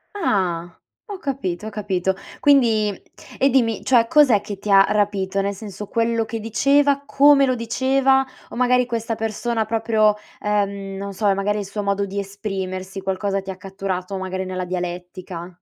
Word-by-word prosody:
Ah. 175 - -1 0.3
Ho 405 -4 -7
capito, 215 - -3
ho - - -3
capito. 190 -3 -1 0.2
Quindi 230 -7 +4 0.5
e 275 - +3
dimmi, 235 -5 +1
cioè 235 -3 +4
cos'è 260 -7 +5
che 205 -1 -7
ti 210 - -6
ha 195 0 +8
rapito? 200 -2 0
Nel 200 +1 -1
senso 205 0 -8
quello 230 -1 +1
che 225 +1 -5
diceva, 280 +6 +2
come 280 0 +5
lo 255 - +1
diceva 265 +3 +2 0.2
o - - -9
magari 250 0 +3
questa 230 -1 -3
persona 225 +1 -2
proprio 220 -1 +2 0.2
ehm, 200 -2 -1
non 200 +1 -5
so, 205 +2 -1
è 200 - +5
magari 205 +2 -1
il 200 - -4
suo 205 +2 -4
modo 200 0 0
di 200 +1 -7
esprimersi, 195 -1 -4
qualcosa 195 +1 -1
ti 190 0 -6
catturato, 190 0 -4
magari 190 0 -4
nella 185 0 -3
dialettica? 180 0 -5
205 Hz, 165 wpm, -21 LUFS, 195-230 Hz, 0.5 s, ha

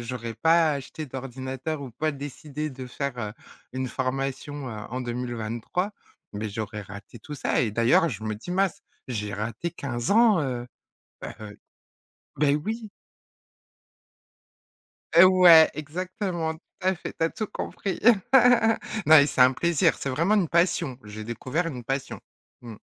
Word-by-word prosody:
j'aurais 115 -1 -5
pas 160 +6 +4
acheté 145 +2 -6
d'ordinateur 130 +3 -5
ou 130 - -7
pas 155 +5 -1
décidé 145 +1 -6
de 130 -1 -8
faire, 140 0 -4
heu, 105 -2 -4 0.4
une 130 0 -2
formation, 135 +2 -3
heu, - - -6 0.2
en 130 - -3
2023, 120 - -3 0.4
mais 105 +1 -4
j'aurais 105 0 -5
raté 100 +3 -11
tout 150 - -8
ça. - - 0
Et 115 -4 0
d'ailleurs, 115 +9 +3
je 110 - -6
me 110 -1 -2
dis 110 +12 -9
mince, 190 0 0 0.2
j'ai 105 -5 -4
raté 115 - -4
15 125 -7 -4
ans, 215 -4 +5
heu. 125 -3 -3 0.6
Bah, - - -6
heu 105 -1 -10 0.8
bah 145 -1 +2
oui. 220 +1 -4 2.3
Heu, 170 - +10 0.2
ouais, 165 -3 +9
exactement, 175 +1 -3
tout 160 - -18 0.2
à 190 0 +1
fait, - - -7
tu - - 0
as 165 - +2
tout 215 -4 -4
compris. 195 -1 -4 1.1
Non, 155 +1 +8
et 145 - +7
c'est 130 - +1
un 125 +1 +7
plaisir, 170 +2 +2
c'est 140 - -4
vraiment 165 +11 +2
une 195 -5 +2
passion. 170 -6 +1
J'ai 105 +1 -8
découvert 130 +9 -2
une 125 -7 -6
passion, 135 +3 -3 0.4
mmh. 115 -3 -9
135 Hz, 155 wpm, -26 LUFS, 120-165 Hz, 2.3 s, Heu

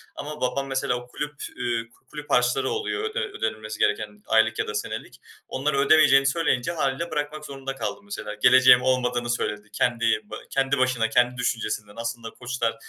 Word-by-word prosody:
ama 150 +1 -7
babam, 135 +2 -1
mesela, 135 -2 0
o 125 0 -7
kulüp, 150 +4 -5 0.2
eee, 115 -2 -2
k 120 - -28
kulüp 150 -1 -8
harçları 125 +2 +2
oluyor 430 0 -2
öde 435 +2 -2
ödenmesi 110 - -4
gereken 105 0 0
aylık 110 0 +3
ya - - 0
da - - -4
senelik; 105 - -5 0.3
onları 140 +2 -1
ödemeyeceğini 135 -2 +6
söyleyince 135 -2 +1
hâliyle 155 0 -1
bırakmak 150 +1 -3
zorunda 135 -1 -6
kaldım, 200 - -5
mesela. 205 - -6
Geleceğim 125 0 +7
olmadığını 125 -2 0
söyledi 105 -3 -2
kendi 115 -3 +1
ba 105 - -9
kendi 135 +1 +1
başına, 125 -3 +1
kendi 125 +2 +2
düşüncesinden, 110 -4 -2
aslında 115 0 -4
koçlar 125 -1 -3
125 Hz, 170 wpm, -25 LUFS, 115-140 Hz, 0.3 s, Geleceğim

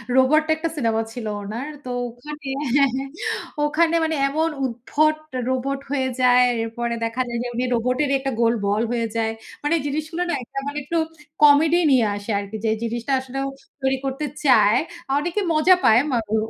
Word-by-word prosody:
Robot 285 +4 +4
একটা 320 +1 -2
cinema 225 -5 +1
ছিল 240 -2 -6 0.2
ওনার, 220 +7 -5 0.2
তো 250 - -4 0.2
ওখানে 295 +4 -9 0.3
হ্যা, 280 -1 +6
হ্যা, 270 +1 -2 0.6
ওখানে 325 +3 +2
মানে 320 0 0
এমন 315 +3 0 0.2
উদ্ভট 275 +6 +1 0.3
রোবট 265 +2 -1
হয়ে 265 -2 0
যায়, 250 0 +6 0.2
এরপরে 235 +1 -3
দেখা 230 +3 -2
যায় 240 0 -3
যে, - - -3
উনি 245 - 0
রোবটেরই 255 +4 +1
একটা 270 0 -2
গোল 230 0 +4
বল 205 +2 +1
হয়ে 230 -1 0
যায়। 225 -1 +1 0.3
মানে 295 +3 +2
জিনিসগুলো 310 +4 -2
না - - 0
একটা 275 - -6
মানে, 285 +1 -4
একটু 335 +5 -2 0.5
কমেডি 300 +4 +6
নিয়ে 250 -4 +4
আসে 205 +2 -5
আরকি 200 +2 -6
যে, - - +2
জিনিসটা 235 +3 -2
আসলে 260 0 -8 0.4
তৈরি 265 0 +1
করতে 270 +3 -2 0.2
চায়। 220 -3 +5 0.4
অনেকে 350 +7 -1
মজা 315 +4 +5
পায়, 220 +1 +6 0.3
ও - - +4
265 Hz, 170 wpm, -22 LUFS, 235-300 Hz, 0.6 s, হ্যা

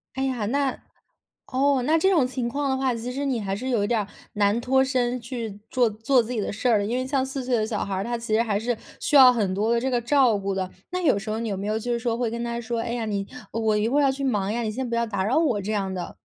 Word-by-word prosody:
哎 265 - -1
呀， 255 -5 -1
那 275 +4 0 0.7
哦， 270 0 +2
那 310 +5 +3
这 380 +4 +3
种 330 -9 +4
情 250 -1 -3
况 280 +3 -1
的 265 - +1
话， 260 -2 0
其 235 +2 -5
实 275 +3 -3
你 255 -5 0
还 195 -1 -2
是 235 +6 -4
有 230 -6 +1
点 215 -2 0 0.3
难 205 +2 +2
脱 265 +2 +3
身 255 -2 0
去 230 -4 -6
做 245 -3 +2
做 225 +4 +2
自 225 - -7
己 240 - -1
的 205 - -2
事 230 +5 0
儿， 210 -3 +3
因 235 +4 -1
为 255 - -1
像 265 0 0
4 265 0 -4
岁 250 0 -2
的 215 -1 0
小 220 -2 -2
孩 195 - -3
儿， 190 - -1
他 240 +2 -2
其 230 -2 -4
实 220 - +4
还 215 -4 0
是 230 +2 -1 0.2
需 295 - +4
要 260 -2 +10
很 205 -6 0
多 215 +4 +1
的 - - +2
这 260 +2 -1
个 245 - +2
照 245 -2 +3
顾 195 0 -2
的。 185 -1 -3 0.2
那 365 0 -2
有 275 - +3
时 215 +2 -7
候 215 +1 -1
你 230 -1 -3
有 195 - -2
没 200 +2 -4
有 215 +1 0
就 240 +2 -3
是 235 - 0
说 230 0 -1
会 240 -2 -1
跟 235 0 -4
他 235 0 -3
说： 235 0 -3
“哎 230 +1 -3
呀， 240 -1 -2
你 200 -2 -2 0.2
我 220 -1 +1
一 210 +2 +1
会 280 +4 +2
儿 - - +4
要 275 - +4
去 275 +1 -5
忙 205 -7 0
呀， 240 - -1
你 220 -2 -2
先 250 +2 -4
不 235 - -1
要 235 0 +1
打 200 -4 -2
扰 235 +8 +2
我” 285 -10 +2
这 210 +3 -3
样 195 -2 -1
的？ 180 -2 -5
235 Hz, 325 characters per minute, -25 LUFS, 215-260 Hz, 0.7 s, 要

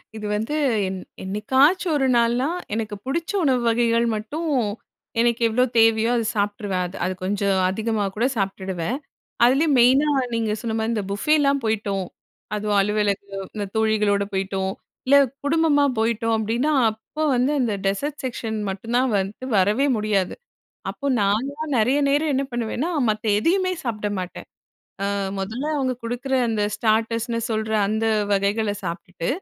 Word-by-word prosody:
இது 215 -1 -6
வந்து 220 +7 -2 0.3
என் 190 0 -4 0.2
என்னைக்காச்சும் 265 - +2
ஒரு 270 - +1
நாள்னா. 235 +2 +2 0.3
எனக்கு 215 -1 -2
பிடிச்ச 330 +6 -2
உணவு 260 -4 +2
வகைகள் 230 0 +2
மட்டும் 300 +10 -3 0.7
எனக்கு 235 0 +2
எவ்ளோ 240 +3 +2
தேவையோ, 225 0 +4
அத 230 - 0
சாப்பிட்டுருவேன். 205 -2 -1
அது 180 - -11
அது 185 - -1
கொஞ்சம் 195 0 +1
அதிகமா 220 +2 -1
கூட 230 +3 +1
சாப்டுடுவேன். 190 +2 -2 0.5
அதுலயும் 275 +5 +4
மெயினா 260 +5 +5 0.3
நீங்க 225 -2 0
சொன்ன 225 -2 -2
மாரி 220 +1 0
இந்த 210 -3 -1
புஃபேலாம் 280 +5 +2
போய்ட்டோம். 200 -4 -1 0.5
அதுவும் 210 0 0
அலுவலக 210 0 +1 0.4
இந்த 205 -1 -2
தோழிகளோட 215 -2 +2
போய்ட்டோம். 190 0 -1 0.4
இல்ல 280 +2 +7 0.3
குடும்பமா 295 -1 +3
போயிட்டோம். 225 0 +1
அப்டின்னா, 230 +7 0 0.2
அப்ப 220 +7 -19 0.2
வந்து 250 +3 +2
அந்த 235 -4 0
டெசர்ட் 280 +10 -1
செக்க்ஷன் 230 -3 -3
மட்டும் 210 +5 -4
தான் 255 0 +2
வந்து, 195 +5 -4
வரவே 210 +8 +3
முடியாது. 210 -3 0 0.6
அப்போ 280 - -6
நான்லாம் 275 +10 -1
நெறைய 250 +6 +3
நேரம் 295 +2 +2
என்ன 270 +1 +1
பண்ணுவேன்னா, 240 +7 -2 0.2
மத்த 215 0 -1
எதையுமே 370 - +1
சாப்பிட 215 -4 -2
மாட்டேன். 180 -1 -6 0.6
அ - - +1 0.3
முதல்ல 220 +9 -3
அவங்க 265 -2 0
கொடுக்குற 245 +3 -2
அந்த 220 -2 0
ஸ்டார்ட்டர்ஸ்னு 230 +1 0
சொல்ற 220 0 -1 0.2
அந்த 220 +1 0 0.3
வகைகள 200 +2 +1
சாப்டுட்டு. 170 0 -5
225 Hz, 140 wpm, -23 LUFS, 205-260 Hz, 0.7 s, இல்ல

